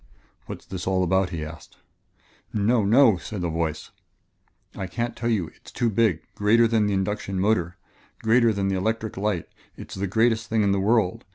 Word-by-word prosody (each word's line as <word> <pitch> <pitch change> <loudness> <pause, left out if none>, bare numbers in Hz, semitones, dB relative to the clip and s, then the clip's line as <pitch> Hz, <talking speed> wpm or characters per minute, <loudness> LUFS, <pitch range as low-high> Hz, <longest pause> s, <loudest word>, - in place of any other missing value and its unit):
"What's - - -8
this 95 -1 -6
all 95 -1 +2
about?" 95 +1 +1
he 80 -2 -4
asked. 80 +1 -12 0.7
"No 110 +2 +2
no!" 115 0 +5
said 95 +1 -6
a 85 - -1
voice; 80 -1 -3 0.8
"I 95 - -4
can't 120 +6 -3
tell 115 +1 -2
you 95 -8 0
it - - -26
is - - -10
too 120 -2 0
big 100 -7 +1
greater 115 +3 +4
than 110 -2 +2
the 100 - 0
induction 95 0 -2
motor 90 -4 +1 0.5
greater 115 +1 +4
than 100 -2 -1
the 95 - 0
electric 110 +3 -2
light 100 -3 -2 0.3
it - - -10
is - - -7
the 100 - -1
greatest 110 +2 +1
thing 110 -1 +2
in 100 - +2
the 100 - +1
world. 105 -2 +1
100 Hz, 195 wpm, -24 LUFS, 95-110 Hz, 0.8 s, no